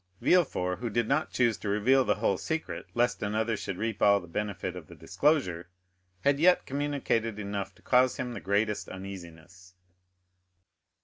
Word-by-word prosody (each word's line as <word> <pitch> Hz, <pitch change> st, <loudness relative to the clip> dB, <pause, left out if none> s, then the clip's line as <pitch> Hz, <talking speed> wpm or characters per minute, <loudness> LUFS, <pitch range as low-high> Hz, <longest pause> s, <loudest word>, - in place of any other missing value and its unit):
Villefort, 90 Hz, -, +2 dB
who 120 Hz, 0 st, -3 dB
did 115 Hz, +1 st, 0 dB
not 150 Hz, +3 st, +1 dB
choose 120 Hz, -4 st, +1 dB
to 105 Hz, -, -4 dB
reveal 125 Hz, +7 st, +3 dB
the -, -, +1 dB
whole 100 Hz, -3 st, 0 dB
secret, 160 Hz, 0 st, -4 dB
lest 120 Hz, +1 st, +1 dB
another 110 Hz, +2 st, 0 dB
should 95 Hz, -2 st, -5 dB
reap 110 Hz, 0 st, -3 dB
all 100 Hz, 0 st, +5 dB
the 90 Hz, -, -11 dB
benefit 95 Hz, 0 st, -4 dB
of 85 Hz, -4 st, -9 dB
the -, -, -12 dB
disclosure, 95 Hz, -, 0 dB, 0.5 s
had 140 Hz, 0 st, +3 dB
yet 180 Hz, +3 st, +4 dB
communicated 135 Hz, -6 st, -1 dB
enough 100 Hz, -1 st, -4 dB
to -, -, -24 dB
cause 130 Hz, 0 st, +3 dB
him 125 Hz, -1 st, -4 dB
the -, -, -5 dB
greatest 105 Hz, +2 st, -1 dB
uneasiness. 90 Hz, -1 st, -10 dB
105 Hz, 165 wpm, -29 LUFS, 95-125 Hz, 0.5 s, all